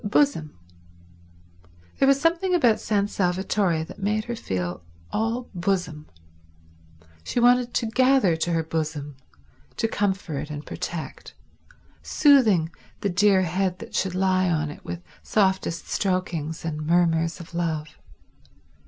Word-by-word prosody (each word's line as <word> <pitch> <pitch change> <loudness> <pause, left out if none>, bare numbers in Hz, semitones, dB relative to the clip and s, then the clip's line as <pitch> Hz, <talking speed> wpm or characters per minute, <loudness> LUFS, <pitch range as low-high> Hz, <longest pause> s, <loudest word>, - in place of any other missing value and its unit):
—bosom. 205 - +1 1.4
There 270 - +4
was 275 0 +5
something 345 +4 +2
about 240 -10 +4
San 205 -2 0
Salvatore 185 -3 0
that 160 - -11
made 210 +2 0
her 235 - -4
feel 90 - -3 0.3
all 225 +3 -1
bosom. 175 -4 -2 1.2
She 245 - -2
wanted 245 0 +4
to - - +1
gather 255 -5 +3
to 165 +2 -1
her 165 -1 +1
bosom, 155 -3 -3 0.6
to 225 - +1
comfort 190 -9 -2
and 150 0 -6
protect, 170 -2 -6 0.7
soothing 220 - +4 0.3
the 200 - 0
dear 190 +1 +4
head 180 +1 -1
that - - -11
should 185 -1 -1
lie 185 -1 +2
on 155 -3 0
it - - -12
with 175 0 -6 0.2
softest 190 -4 0
strokings 175 -5 -2
and 155 -2 -3
murmurs 165 -1 +2
of 170 0 -11
love. 160 -3 -2
185 Hz, 125 wpm, -25 LUFS, 160-215 Hz, 1.4 s, was